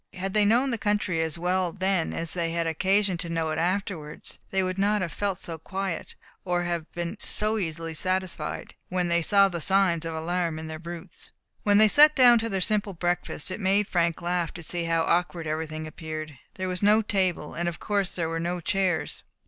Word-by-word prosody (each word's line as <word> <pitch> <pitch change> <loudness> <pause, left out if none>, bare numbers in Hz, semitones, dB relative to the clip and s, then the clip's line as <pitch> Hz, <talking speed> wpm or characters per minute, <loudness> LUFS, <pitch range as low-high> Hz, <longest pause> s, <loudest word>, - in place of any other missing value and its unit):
Had 190 +1 -3
they 210 -1 +4
known 245 +6 +3
the 230 - -2
country 205 -5 0
as 160 0 -1
well 180 +1 0
then 190 -2 0
as 165 -1 -3
they 170 -2 -1
had 170 0 -1
occasion 190 +4 +1
to 170 0 -4
know 165 -1 -1
it 155 - -2
afterwards, 175 -3 -3
they 190 -1 +1
would 185 +1 -2
not 205 0 +2
have 170 - -3
felt 200 -3 -2
so 165 -1 -6
quiet, 190 +1 -4 0.3
or 175 -1 0
have 170 -2 -3
been 175 +4 -4
so 215 +1 +1
easily 165 -2 -3
satisfied, 185 +2 -2 0.2
when 180 -1 0
they 170 0 +2
saw 200 +4 +5
the 175 -3 -4
signs 190 -2 +3
of 165 -1 -4
alarm 170 0 -1
in 160 - -6
their 160 0 -6
brutes. 170 +1 -9 0.3
When 205 -1 +4
they 215 +1 +7
sat 300 +7 +7
down 245 -2 +7
to 230 +1 -2
their 195 -3 -1
simple 210 +1 0
breakfast, 175 -1 -1
it 185 - -4
made 200 +1 +2
Frank 170 -2 0
laugh 175 -1 0
to 175 - -7
see 170 +1 -3
how 165 0 +1
awkward 175 -1 0
everything 155 0 -3
appeared. 155 -1 -6 0.2
There 185 0 -3
was 180 0 -3
no 210 +2 +5
table, 185 -7 0
and 175 +1 -1
of 170 - -8
course 200 -3 -1
there 170 -2 -1
were 165 0 -2
no 175 +2 -2
chairs. 175 -3 -1
180 Hz, 210 wpm, -26 LUFS, 165-195 Hz, 0.3 s, they